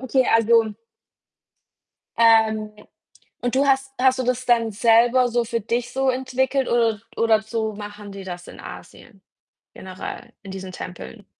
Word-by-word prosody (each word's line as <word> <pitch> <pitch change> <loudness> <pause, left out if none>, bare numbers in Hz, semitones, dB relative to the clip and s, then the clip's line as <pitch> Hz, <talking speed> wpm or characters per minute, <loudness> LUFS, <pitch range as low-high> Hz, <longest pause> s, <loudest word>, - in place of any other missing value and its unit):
okay, 260 0 +1
also 225 -2 +3 1.4
ähm, 220 -2 +4 0.7
und 245 0 -1
du 275 +2 +2
hast 270 0 +1
hast 260 0 +3
du - - 0
das 250 +1 -1
dann 230 -2 +2
selber 235 +3 +4
so 240 0 0
für 230 0 -2
dich 235 +3 -3
so 270 +1 0
entwickelt 260 +1 -1
oder 230 -3 +1 0.2
oder 225 -1 +3
so 220 -1 -3
machen 205 0 -9
die 195 -1 -9
das 175 -1 -8
in - - -12
Asien 200 -6 -12 0.5
generell 185 0 -8
in 195 - -9
diesen 190 -1 -7
Tempeln? 65 - -9
230 Hz, 145 wpm, -22 LUFS, 210-255 Hz, 1.4 s, ähm